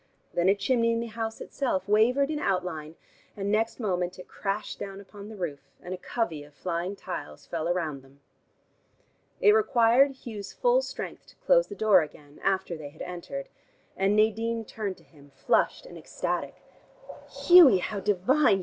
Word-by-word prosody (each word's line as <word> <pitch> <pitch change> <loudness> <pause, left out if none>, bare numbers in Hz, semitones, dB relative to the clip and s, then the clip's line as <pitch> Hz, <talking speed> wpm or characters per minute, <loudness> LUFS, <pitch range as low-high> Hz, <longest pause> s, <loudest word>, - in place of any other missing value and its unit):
Then 175 +2 +2
a 195 - +5
chimney 230 +3 +1
in 230 - 0
the 235 - -2
house 225 0 -4
itself 190 -9 -2
wavered 245 +8 +3
in 300 - -2
outline, 165 - -2 0.4
and 200 0 -2
next 225 +3 0
moment 180 -5 -1
it 180 - -11
crashed 200 +1 -4
down 195 0 -6
upon 200 +1 -11
the 220 - -9
roof, 170 -7 -4 0.2
and 180 - -7
a - - -4
covey 175 -7 -3
of 145 0 -18
flying 175 +5 -3
tiles 75 - -7
fell 170 0 -2
round 160 -6 -2
them. 135 +1 -21 1.2
It 420 - +7
required 270 - +3
Hugh's 205 -4 -7
full - - +3
strength - - -7
to - - -18
close - - +3
the 405 - -8
door 210 - +5
again, 145 -1 -10
after 190 -2 0
they 150 -3 -8
had - - -9
entered, 180 +11 -6 0.5
and 195 +2 +2
Nadine 225 +1 +1
turned 205 -3 -5
to - - -20
him, 145 -3 -19
flushed 135 - +1
and - - -10
ecstatic. - - -3 0.7
"Hughie, 345 - +7
how 200 +3 -3
divine!" 205 +4 +3
200 Hz, 170 wpm, -27 LUFS, 175-230 Hz, 1.2 s, It